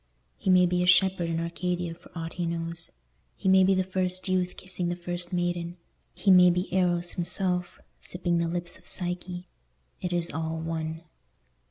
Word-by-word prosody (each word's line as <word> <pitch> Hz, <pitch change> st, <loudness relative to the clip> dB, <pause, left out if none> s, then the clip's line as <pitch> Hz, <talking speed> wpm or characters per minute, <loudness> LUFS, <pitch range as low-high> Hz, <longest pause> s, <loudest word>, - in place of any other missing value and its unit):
He -, -, -1 dB
may 180 Hz, -1 st, +6 dB
be 180 Hz, 0 st, +1 dB
a 180 Hz, -, +1 dB
shepherd 180 Hz, -1 st, +4 dB
in 165 Hz, 0 st, -1 dB
Arcadia 175 Hz, 0 st, -2 dB
for 165 Hz, -, -17 dB
aught 165 Hz, -1 st, -5 dB
he 175 Hz, -1 st, -2 dB
knows, 165 Hz, 0 st, -4 dB, 0.5 s
he -, -, -3 dB
may 190 Hz, 0 st, +6 dB
be 190 Hz, +1 st, +4 dB
the 185 Hz, -, +2 dB
first 185 Hz, 0 st, -1 dB
youth 185 Hz, -1 st, 0 dB
kissing 180 Hz, -1 st, -2 dB
the 175 Hz, -, -1 dB
first 175 Hz, 0 st, -2 dB
maiden, 175 Hz, -1 st, -2 dB, 0.4 s
he 195 Hz, -, +3 dB
may 180 Hz, -1 st, +8 dB
be 180 Hz, +1 st, -1 dB
Eros 175 Hz, -2 st, +2 dB
himself, 180 Hz, 0 st, -1 dB, 0.2 s
sipping 175 Hz, -1 st, -1 dB
the 170 Hz, -, +1 dB
lips 175 Hz, +1 st, -4 dB
of -, -, -19 dB
Psyche—it 175 Hz, -, -6 dB
is 175 Hz, -1 st, +1 dB
all 160 Hz, +1 st, -3 dB
one. 160 Hz, 0 st, -4 dB
175 Hz, 175 wpm, -27 LUFS, 170-180 Hz, 0.5 s, may